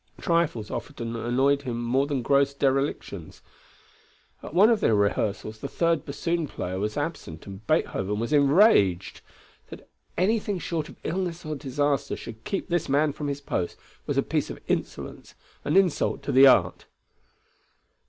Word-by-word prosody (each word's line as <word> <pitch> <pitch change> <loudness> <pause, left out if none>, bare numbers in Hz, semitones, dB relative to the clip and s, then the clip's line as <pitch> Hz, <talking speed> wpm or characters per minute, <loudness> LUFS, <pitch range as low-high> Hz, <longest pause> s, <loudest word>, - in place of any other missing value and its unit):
Trifles 165 -11 0
often 115 -5 -5
annoyed 130 +5 +1
him 120 -4 -4
more 130 +4 +1
than 140 -4 -2
gross 140 +1 +2
derelictions. 135 - -2 1.0
At - - -9
one 205 +6 +6
of 225 - +2
the 110 - +3
rehearsals 105 +1 -1
the 140 - -5
third 165 0 0
bassoon 165 +3 -2
player 95 -7 -5
was 105 +5 -2
absent 145 - -5
and 100 +2 -10
Beethoven 105 +2 0
was 115 +6 -2
enraged. 140 - +4 0.5
That - - -11 0.3
anything 205 +1 +1
short 165 -2 -3
of - - -13
illness 175 -1 -3
or 155 - -3
disaster 140 0 -1
should 110 -1 -10
keep 195 - -3
this 175 -5 -1
man 145 +1 +2
from 150 0 -5
his 140 0 -3
post 90 -10 -3 0.3
was - - -1
a - - +3
piece - - -1
of - - -7
insolence, - - -4 0.3
an 150 - +1
insult 180 -6 +1
to 140 - -2
the 135 +1 +8
art. 130 - +3
140 Hz, 155 wpm, -26 LUFS, 115-165 Hz, 1.0 s, the